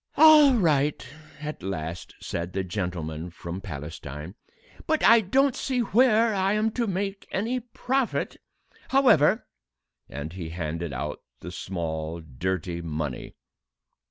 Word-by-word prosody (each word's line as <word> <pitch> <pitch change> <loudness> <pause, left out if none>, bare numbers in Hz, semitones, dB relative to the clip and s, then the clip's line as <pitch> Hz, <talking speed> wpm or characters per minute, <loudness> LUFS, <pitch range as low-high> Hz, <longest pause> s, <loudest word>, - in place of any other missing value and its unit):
"All 305 -3 +8
right," 150 - +2 0.3
at 150 -5 -5
last 85 -3 -5
said 85 +1 -4
the 95 - -1
gentleman 85 -4 -4
from 85 +2 -7
Palestine, 75 -1 -7 0.5
"but 315 0 +1
I 230 0 +7
don't 265 +7 +2
see 255 -2 -1
where 230 0 +4
I 195 0 +1
am 215 +1 +1
to 235 0 -1
make 195 +1 -3
any 230 +6 -1
profit; 245 +1 -2 0.5
however 235 - +4 0.3
" - - -49
And 75 +4 -6
he 85 -4 -6
handed 85 -1 -4
out - - -4 0.2
the - - -7
small, 80 -2 -4
dirty 85 +3 -3
money. 75 -5 -4
95 Hz, 130 wpm, -26 LUFS, -, 0.5 s, All